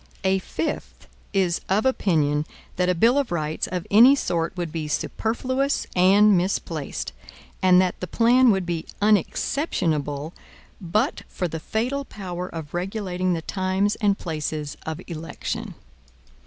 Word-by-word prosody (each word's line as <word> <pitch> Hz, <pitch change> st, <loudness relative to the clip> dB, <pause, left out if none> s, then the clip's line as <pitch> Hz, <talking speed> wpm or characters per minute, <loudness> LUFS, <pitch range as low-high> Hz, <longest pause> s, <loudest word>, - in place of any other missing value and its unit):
A 190 Hz, 0 st, +2 dB
fifth 300 Hz, -, -4 dB, 0.3 s
is 185 Hz, -3 st, +1 dB
of 205 Hz, +5 st, +2 dB
opinion 155 Hz, -, +1 dB, 0.3 s
that 180 Hz, 0 st, +1 dB
a 180 Hz, -, +2 dB
bill 235 Hz, +10 st, +4 dB
of 275 Hz, -, -2 dB
rights 155 Hz, -2 st, -1 dB
of 180 Hz, -1 st, -4 dB
any 240 Hz, +7 st, +8 dB
sort 170 Hz, -8 st, -2 dB
would 170 Hz, -3 st, -3 dB
be 155 Hz, -2 st, -3 dB
superfluous 260 Hz, -, -1 dB
and 195 Hz, +3 st, +6 dB
misplaced, 175 Hz, -4 st, -2 dB, 0.5 s
and 185 Hz, -1 st, +6 dB
that 185 Hz, -1 st, +1 dB
the 180 Hz, -, -4 dB
plan 240 Hz, +6 st, +4 dB
would 190 Hz, -4 st, +2 dB
be 170 Hz, -2 st, -3 dB
unexceptionable 165 Hz, -, 0 dB, 0.5 s
but 210 Hz, -, 0 dB
for 180 Hz, -, -3 dB
the 160 Hz, -1 st, -5 dB
fatal 245 Hz, -, -2 dB
power 180 Hz, -7 st, -6 dB
of 160 Hz, -4 st, -8 dB
regulating 185 Hz, 0 st, -1 dB
the 165 Hz, -1 st, -3 dB
times 190 Hz, +3 st, 0 dB
and 205 Hz, -3 st, +2 dB
places 155 Hz, -3 st, -4 dB
of 160 Hz, +1 st, -3 dB
election. 165 Hz, -1 st, -5 dB
185 Hz, 140 wpm, -24 LUFS, 165-210 Hz, 0.5 s, any